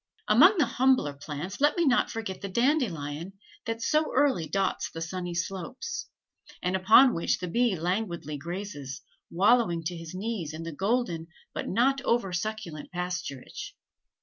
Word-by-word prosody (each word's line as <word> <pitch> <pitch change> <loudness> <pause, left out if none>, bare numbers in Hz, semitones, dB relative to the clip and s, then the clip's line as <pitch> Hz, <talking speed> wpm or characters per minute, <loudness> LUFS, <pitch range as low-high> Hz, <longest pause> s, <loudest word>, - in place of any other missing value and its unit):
Among 390 +3 +7
the 300 - +4
humbler 250 - +2
plants, 150 - -6
let 295 +3 +4
me 340 - +3
not 255 -3 +3
forget 220 -5 -5
the 200 - -4
dandelion 190 - 0 0.3
that 225 0 -3
so 305 +3 +2
early 260 - +3
dots 195 -1 0
the 165 - -8
sunny 175 +1 -4
slopes, 195 - -4 0.6
and 180 +1 +1
upon 220 +7 +7
which 165 - 0
the 180 - -5
bee 235 +3 +2
languidly 170 -3 -2
grazes, 145 -6 -6 0.3
wallowing 190 -2 +3
to 175 +2 -3
his 165 +1 -8
knees 190 -6 -3
in 165 - -6
the 165 - -5
golden 190 - -1 0.3
but - - -4
not 265 +7 +2
over 230 -6 +1
succulent 175 -5 -4
pasturage. 180 -7 -5
190 Hz, 150 wpm, -28 LUFS, 165-235 Hz, 0.6 s, Among